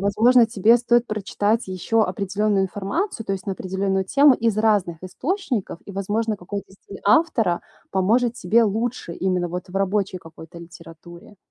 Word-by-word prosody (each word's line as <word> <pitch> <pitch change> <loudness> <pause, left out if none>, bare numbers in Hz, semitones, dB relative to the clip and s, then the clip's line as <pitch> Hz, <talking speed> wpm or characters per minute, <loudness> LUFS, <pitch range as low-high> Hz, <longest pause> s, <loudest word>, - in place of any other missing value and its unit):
возможно 230 +5 +4
тебе 225 +1 +4
стоит 240 0 +2
прочитать 215 +1 -1
еще 190 +5 0
определённую 200 -1 0
информацию, 210 - -3
то - - -2
есть 190 -1 -5
на 195 - -1
определённую 190 +1 -2
тему, 280 +6 +5
из 225 -3 0
разных 205 -7 +1
источников, 225 - -3
и 200 - -8
возможно 210 +3 -2
какой-то 195 +2 -7
стиль 195 0 -12
автора 215 - +2 0.3
поможет 225 +6 +1
тебе 230 +3 +2
лучше 220 -3 -2
именно 180 -1 -1
вот 180 +1 -6
в 185 - -6
рабочей 195 -1 -1
какой-то 165 0 -13
литературе. 170 +3 -14
200 Hz, 150 wpm, -22 LUFS, 185-225 Hz, 0.3 s, тему